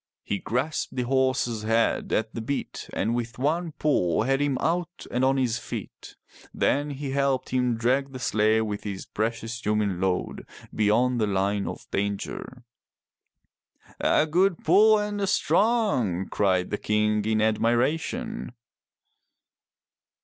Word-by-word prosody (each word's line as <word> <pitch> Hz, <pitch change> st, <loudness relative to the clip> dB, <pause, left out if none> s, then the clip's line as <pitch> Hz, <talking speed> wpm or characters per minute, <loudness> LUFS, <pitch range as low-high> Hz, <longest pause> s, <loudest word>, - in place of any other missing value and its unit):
He 100 Hz, -, -2 dB
grasped 130 Hz, +7 st, -2 dB
the 125 Hz, -, 0 dB
horse's 130 Hz, -3 st, +1 dB
head 115 Hz, +1 st, +1 dB
at 110 Hz, 0 st, 0 dB
the 115 Hz, -, -4 dB
bit, 140 Hz, +5 st, -4 dB
and 110 Hz, +4 st, -1 dB
with 120 Hz, 0 st, -3 dB
one 160 Hz, +5 st, -1 dB
pull 100 Hz, -, +1 dB
had 135 Hz, +3 st, +1 dB
him 145 Hz, -2 st, +1 dB
out 175 Hz, +1 st, -2 dB
and 125 Hz, +1 st, 0 dB
on 135 Hz, +1 st, +3 dB
his 120 Hz, -3 st, 0 dB
feet. -, -, -8 dB, 0.4 s
Then 145 Hz, +1 st, +1 dB
he 140 Hz, -1 st, -5 dB
helped 140 Hz, -1 st, 0 dB
him 125 Hz, -2 st, +1 dB
drag 130 Hz, +4 st, +1 dB
the 130 Hz, -, -7 dB
sleigh 110 Hz, -3 st, +2 dB
with 105 Hz, -2 st, -3 dB
its 100 Hz, -2 st, -5 dB
precious 115 Hz, +2 st, -3 dB
human 105 Hz, -4 st, 0 dB
load 95 Hz, -1 st, -2 dB, 0.3 s
beyond 120 Hz, +3 st, +2 dB
the 105 Hz, -, +2 dB
line 100 Hz, +1 st, 0 dB
of -, -, -6 dB
danger. 100 Hz, +5 st, -3 dB, 1.4 s
A 150 Hz, -, +3 dB
good 175 Hz, +3 st, +1 dB
pull 215 Hz, +6 st, +6 dB
and 210 Hz, -1 st, -2 dB
a 195 Hz, -, 0 dB
strong!'' 195 Hz, -, +1 dB
cried 95 Hz, -3 st, +1 dB
the 105 Hz, -, -2 dB
King 105 Hz, 0 st, +1 dB
in 110 Hz, 0 st, +1 dB
admiration. 120 Hz, -, 0 dB
120 Hz, 140 wpm, -26 LUFS, 105-145 Hz, 1.4 s, pull